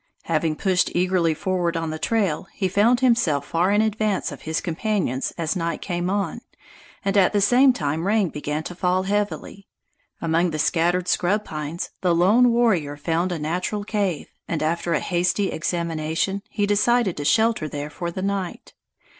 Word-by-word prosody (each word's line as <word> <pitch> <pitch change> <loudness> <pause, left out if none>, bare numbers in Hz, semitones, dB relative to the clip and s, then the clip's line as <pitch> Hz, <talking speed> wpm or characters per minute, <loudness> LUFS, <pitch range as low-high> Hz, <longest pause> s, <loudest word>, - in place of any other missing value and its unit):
Having 160 -1 0
pushed 185 +1 +1
eagerly 175 -2 +2
forward 175 -1 -1
on 165 -1 -2
the 155 - -5
trail, 195 -6 0
he 190 - 0
found 220 +7 +3
himself 230 - +2
far 170 +5 +1
in 210 +1 +3
advance 215 -2 -1
of - - -9
his 160 - 0
companions 170 - -1
as 165 +1 -1
night 170 -2 -2
came 175 -1 -2
on, 200 +2 -2 0.6
and 195 0 0
at 195 -1 +4
the 205 - +3
same 250 +7 +5
time 160 - -2
rain 205 -3 +2
began 150 +1 -4
to 175 - -6
fall 180 +1 0
heavily. 200 0 -3 0.5
Among 165 +2 +1
the 155 - -3
scattered 175 +3 +1
scrub 205 +5 +1
pines, 155 +2 -5
the 180 -3 +2
lone 210 +9 +5
warrior 190 -12 +1
found 165 +4 -1
a 175 - -2
natural 180 +7 -2
cave, 200 -6 -1 0.2
and 155 -2 -2
after 170 +2 0
a 150 - +2
hasty 180 +3 0
examination, 165 +3 -2
he 205 - 0
decided 205 0 +2
to 145 - -3
shelter 220 0 +2
there 145 +1 -5
for 170 +3 -4
the 185 +2 -5
night. 195 -2 -3
180 Hz, 170 wpm, -23 LUFS, 165-205 Hz, 0.6 s, same